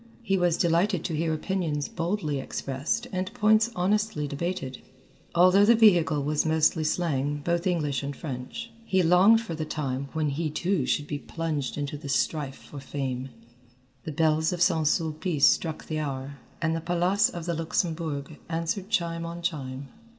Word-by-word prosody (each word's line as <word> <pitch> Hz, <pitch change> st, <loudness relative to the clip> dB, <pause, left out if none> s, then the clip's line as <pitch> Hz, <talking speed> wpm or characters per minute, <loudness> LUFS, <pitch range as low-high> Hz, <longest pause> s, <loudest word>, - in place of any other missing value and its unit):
He 195 Hz, -4 st, +1 dB
was 175 Hz, -3 st, +2 dB
delighted 175 Hz, +1 st, +2 dB
to 165 Hz, -, -2 dB
hear 160 Hz, +1 st, 0 dB
opinions 155 Hz, -3 st, -1 dB
boldly 165 Hz, -4 st, -2 dB
expressed 135 Hz, -, -3 dB
and 185 Hz, -1 st, -2 dB
points 215 Hz, +2 st, +4 dB
honestly 200 Hz, -4 st, 0 dB
debated, 140 Hz, -3 st, -4 dB, 0.5 s
although 185 Hz, +3 st, +6 dB
the 235 Hz, +3 st, +6 dB
vehicle 170 Hz, -9 st, +4 dB
was 150 Hz, +1 st, +1 dB
mostly 160 Hz, 0 st, +2 dB
slang, 145 Hz, -3 st, 0 dB
both 170 Hz, +1 st, 0 dB
English 150 Hz, -7 st, 0 dB
and 140 Hz, 0 st, -4 dB
French. 155 Hz, -, -6 dB
He 190 Hz, -4 st, +2 dB
longed 185 Hz, +7 st, +6 dB
for 225 Hz, -7 st, -6 dB
the 160 Hz, 0 st, -3 dB
time 140 Hz, -3 st, -3 dB
when 155 Hz, -2 st, 0 dB
he 155 Hz, +3 st, -2 dB
too 170 Hz, -1 st, 0 dB
should 145 Hz, -, +1 dB
be 145 Hz, 0 st, -4 dB
plunged 155 Hz, -5 st, -3 dB
into 145 Hz, 0 st, -3 dB
the 145 Hz, -, -8 dB
strife 135 Hz, 0 st, 0 dB
for 145 Hz, -, -11 dB
fame. 135 Hz, -1 st, -4 dB, 0.7 s
The 160 Hz, -, -5 dB
bells 160 Hz, +1 st, +2 dB
of 180 Hz, -, -3 dB
St. 165 Hz, -4 st, +3 dB
Sulpice 155 Hz, 0 st, +1 dB
struck 160 Hz, -2 st, +2 dB
the 155 Hz, -1 st, -3 dB
hour, 140 Hz, -1 st, -4 dB, 0.2 s
and 165 Hz, 0 st, +1 dB
the 165 Hz, -, -3 dB
Palace 175 Hz, +5 st, +2 dB
of 170 Hz, -2 st, -6 dB
the 170 Hz, -, -1 dB
Luxembourg 160 Hz, -3 st, -2 dB
answered 170 Hz, +4 st, -2 dB
chime 170 Hz, -5 st, 0 dB
on 170 Hz, +1 st, -7 dB
chime. 135 Hz, -5 st, -4 dB
160 Hz, 165 wpm, -27 LUFS, 145-180 Hz, 0.7 s, although